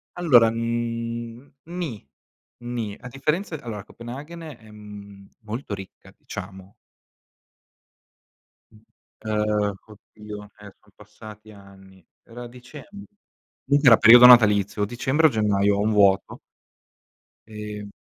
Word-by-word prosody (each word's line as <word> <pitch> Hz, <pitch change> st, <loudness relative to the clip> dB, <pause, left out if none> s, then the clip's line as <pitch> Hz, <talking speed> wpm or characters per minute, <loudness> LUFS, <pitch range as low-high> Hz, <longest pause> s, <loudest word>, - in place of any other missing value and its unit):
Allora, 130 Hz, -10 st, +4 dB
mhmm, 115 Hz, +2 st, -5 dB
ni, 165 Hz, -, -7 dB, 0.5 s
ni, 120 Hz, -4 st, -6 dB
a 125 Hz, -, -11 dB
differenza 155 Hz, +8 st, -3 dB
allora, 110 Hz, -6 st, -7 dB
Copenaghen, 135 Hz, -, -10 dB
ehm, 105 Hz, -8 st, -13 dB
è -, -, -39 dB
molto 110 Hz, +1 st, -7 dB
ricca, 95 Hz, -1 st, -13 dB
diciamo. 95 Hz, 0 st, -10 dB, 2.5 s
Uhm, 105 Hz, -1 st, -1 dB
oddio, 105 Hz, 0 st, -12 dB, 0.2 s
ehm 105 Hz, 0 st, -12 dB
sono 105 Hz, -, -28 dB
passati 105 Hz, +1 st, -14 dB
anni. 95 Hz, -2 st, -18 dB, 0.2 s
Era 120 Hz, +1 st, -10 dB
dicem 125 Hz, +4 st, -13 dB, 0.8 s
comunque 140 Hz, 0 st, +3 dB
era 115 Hz, -, +7 dB
periodo 120 Hz, +2 st, +8 dB
natalizio, 105 Hz, -4 st, +5 dB
o -, -, +3 dB
dicembre 130 Hz, +7 st, +1 dB
o -, -, +3 dB
gennaio, 105 Hz, -3 st, +1 dB
ho -, -, -1 dB
un 110 Hz, +2 st, 0 dB
vuoto. 100 Hz, +3 st, +2 dB, 1.1 s
Ehm 105 Hz, -1 st, -8 dB
110 Hz, 110 wpm, -23 LUFS, 105-120 Hz, 2.5 s, periodo